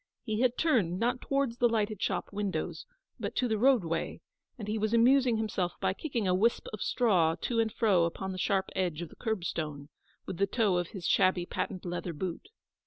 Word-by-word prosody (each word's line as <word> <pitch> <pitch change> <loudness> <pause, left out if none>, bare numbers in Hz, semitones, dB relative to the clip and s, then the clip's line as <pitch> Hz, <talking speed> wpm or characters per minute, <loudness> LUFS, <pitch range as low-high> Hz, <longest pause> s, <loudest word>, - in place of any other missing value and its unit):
He 215 -2 -2
had 250 -1 +2
turned, 205 - +2
not 245 +2 0
towards 275 -4 0
the 240 - +4
lighted 215 -3 -1
shop - - -2
windows, 205 - -3 0.3
but - - -4
to 250 - +1
the 220 -2 0
roadway; 210 -11 +2 0.4
aud 210 - -6
he 215 +1 -1
was 215 +2 +1
amusing 245 0 +5
himself 195 -5 -1
by - - +1
kicking 235 -4 -2
a 180 - +3
wisp 220 +6 +2
of 215 - -6
straw 180 -9 +2
to 235 -2 0
and 225 -1 +2
fro 195 -8 +3
upon 190 +3 -4
the 185 - -5
sharp 195 -1 0
edge 175 -3 -1
of 170 - -8
the - - -15
curbstone, 160 -9 -3 0.4
with 175 - -5
the 200 - +2
toe 205 -4 +2
of 175 -1 -1
his 185 -3 -8
shabby 185 0 +3
patent 185 +1 -4
leather 175 0 -3
boot. 180 - -5
205 Hz, 200 wpm, -30 LUFS, 180-230 Hz, 0.4 s, amusing